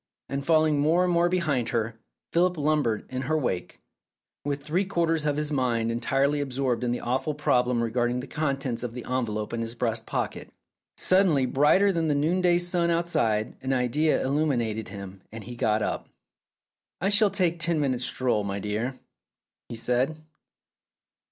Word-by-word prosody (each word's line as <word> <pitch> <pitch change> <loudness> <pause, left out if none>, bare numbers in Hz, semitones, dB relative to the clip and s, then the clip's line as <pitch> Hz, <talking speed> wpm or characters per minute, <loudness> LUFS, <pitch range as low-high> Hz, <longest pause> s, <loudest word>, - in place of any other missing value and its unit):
And 140 0 -3
falling 155 -1 +3
more 160 +5 +3
and 180 -1 +1
more 170 +1 +3
behind 155 -9 0
her, 115 -1 -2 0.3
Philip 180 +1 +2
lumbered 145 -7 +1
in 130 0 -2
her 155 - +2
wake, 120 - -3 0.6
with 140 0 -3
three 165 +6 0
quarters 165 -5 0
of 145 -1 0
his 150 0 -1
mind 120 -5 0
entirely 135 +5 +1
absorbed 130 -3 -1
in 120 - 0
the 120 - -1
awful 130 +5 -1
problem 125 -4 +2
regarding 120 +1 0
the 125 - -5
contents 135 -5 -2
of 120 -2 -4
the 125 - -6
envelope 115 -4 -2
in 115 - -2
his 115 +1 -4
breast 115 -2 -2
pocket. - - -3 0.5
Suddenly, 185 -8 +3
brighter 150 +10 +4
than 165 -3 0
the 150 - +2
noondav 175 +2 +2
outside, 120 -11 0
an 130 0 -1
idea 135 +5 +1
illuminated 125 -7 0
him, 95 -1 -9
and 110 0 -8
he 120 +3 -8
got 110 -2 +1
up. - - -3 0.9
"I 195 - +1
shall 205 +1 +5
take 180 -4 0
ten 165 -1 +1
minutes' 130 -4 0
stroll, 120 -5 0
my 100 0 -3
dear," 110 +6 -3 0.7
he - - -5
said. 125 +6 0
135 Hz, 165 wpm, -26 LUFS, 120-160 Hz, 0.9 s, shall